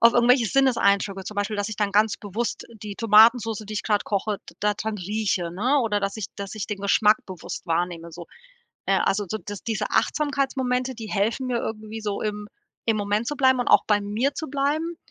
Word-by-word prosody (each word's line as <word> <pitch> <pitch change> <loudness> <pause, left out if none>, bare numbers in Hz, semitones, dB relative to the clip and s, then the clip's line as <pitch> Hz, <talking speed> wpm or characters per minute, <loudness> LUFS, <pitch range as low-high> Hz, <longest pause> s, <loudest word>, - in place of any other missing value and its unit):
auf 230 +1 +7
irgendwelche 240 0 +4
Sinneseindrücke, 200 -7 +2
zum 210 - -7
Beispiel, 205 +1 -1
dass 205 +1 -1
ich 215 - -6
dann 205 -2 0
ganz 210 +1 +3
bewusst 215 +4 -4 0.2
die 205 -1 -6
Tomatensoße, 225 0 +5
die 215 - -7
ich - - -2
gerade 210 -2 +1
koche, 205 0 -1
d - - -21
da 210 0 +1
dran 215 0 -4
rieche, 195 -2 -1
ne, 250 +11 +2
oder 210 -4 0
dass 195 +1 -2
ich 215 -4 -4
dass 200 0 -6
ich 215 - -4
den 205 -2 -5
Geschmack 210 +2 +4
bewusst 185 0 -7
wahrnehme, 170 0 -2
so. 170 0 -9 0.6
Äh, - - +3
also 205 +1 0
so, 220 - -3
dass 205 -2 -8
diese 225 -2 -1
Achtsamkeitsmomente, 265 -3 0
die 225 -2 -8
helfen 220 +6 0
mir 240 -1 0
irgendwie 220 0 -5
so 205 -2 -3
im 210 -1 -3 0.4
im 225 -1 +2
Moment 205 +2 -1
zu 295 - -3
bleiben 260 -2 +4
und - - -1
auch - - +6
bei 210 -1 +3
mir 220 +8 -1
zu 315 - -5
bleiben 300 +5 -1
215 Hz, 210 wpm, -24 LUFS, 200-240 Hz, 0.6 s, auf